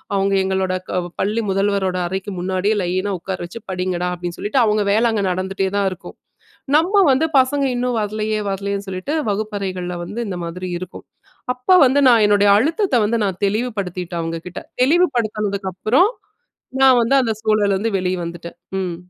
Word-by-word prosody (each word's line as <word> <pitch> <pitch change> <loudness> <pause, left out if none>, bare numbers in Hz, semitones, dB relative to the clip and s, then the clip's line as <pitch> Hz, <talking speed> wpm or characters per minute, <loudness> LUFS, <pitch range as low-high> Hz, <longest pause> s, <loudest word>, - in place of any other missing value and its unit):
அவங்க 195 0 +1
எங்களோட 190 -1 -1 0.2
க 185 - 0 0.2
பள்ளி 215 +4 0
முதல்வரோட 195 -1 0
அறைக்கு 190 +2 -4
முன்னாடியே 190 +4 0
லைனா 185 +3 -1
உக்கார 185 +2 -5
வச்சு 230 +7 -9
படிங்கடா 180 -1 -2
அப்டின்னு 175 -1 -6
சொல்லிட்டு 215 +6 +1
அவங்க 210 -1 +2
வேல 230 +2 +3
அங்க 215 -2 -1
நடந்துட்டே 190 +1 -2
தான் 200 -1 +2
இருக்கும். 185 - -10 0.6
நம்ம 350 +7 +2 0.2
வந்து 280 +5 +2
பசங்க 275 +2 +2
இன்னும் 245 0 -1
வர்லையே 215 +1 -2
வர்லையேன்னு 200 +1 -3
சொல்லிட்டு 185 +8 -4 0.2
வகுப்பறைகள்ல 195 -4 -3
வந்து 210 +7 -6
இந்த 185 - -4
மாதிரி 180 +2 -5
இருக்கும். 185 +1 -9 0.5
அப்போ 250 +9 +2
வந்து 270 +3 +3
நான் 235 -3 +6
என்னுடைய 205 0 +4
அழுத்தத்த 320 - +1
வந்து 225 +3 +1
நான் 190 -3 -3
தெளிவுபடுத்திட்டேன் 195 -6 -3
அவங்க 165 0 -3
கிட்ட. 180 +1 -6 0.2
தெளிவுபடுத்தினதுக்கப்புறம் 220 - +1 0.7
நான் 260 -2 +6
வந்து 235 +4 +2
அந்த 225 -3 0
சூழல்ல 215 -2 +2
இருந்து 220 +3 -1
வெளிவந்துட்டேன். 175 -2 -4 0.2
ம். 180 -3 -3
200 Hz, 155 wpm, -20 LUFS, 185-230 Hz, 0.7 s, நான்